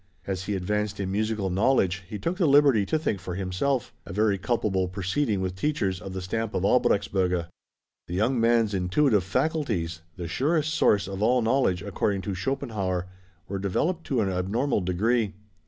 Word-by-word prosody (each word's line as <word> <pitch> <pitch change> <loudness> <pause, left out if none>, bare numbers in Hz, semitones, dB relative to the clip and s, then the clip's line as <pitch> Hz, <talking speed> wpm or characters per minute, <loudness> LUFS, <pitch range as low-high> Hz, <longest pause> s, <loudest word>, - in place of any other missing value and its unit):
As 95 -1 -3
he 105 - -1
advanced 105 +2 -2
in 95 -1 -2
musical 105 -1 -1
knowledge 95 -2 +2
he 105 - -4
took 170 - -2
the 180 -5 +3
liberty 140 -8 +5
to 155 - +1
think 130 -10 -1
for 90 -1 -5
himself; 100 +8 -1
a - - -10
very 105 +1 +1
culpable 95 -4 0
proceeding 100 +4 -1
with 95 -1 -2
teachers 95 -7 -1
of 95 0 -7
the 95 -1 -4
stamp 110 +4 -3
of 90 - 0
Albrechtsberger. 95 -6 +2 0.6
The 90 - -4
young 115 +6 +1
man's 115 -2 +3
intuitive 100 +4 +2
faculties, 110 - -1
the 85 -2 -5
surest 155 - 0
source 105 - +3
of 95 0 -5
all 120 +2 +3
knowledge 115 -7 +2
according 100 0 -1
to 100 - -3
Schopenhauer, 95 -5 -2 0.4
were 100 +1 -3
developed 160 - -1
to 130 -5 0
an 100 - 0
abnormal 100 +8 0
degree. 105 +4 0
100 Hz, 170 wpm, -26 LUFS, 95-125 Hz, 0.6 s, liberty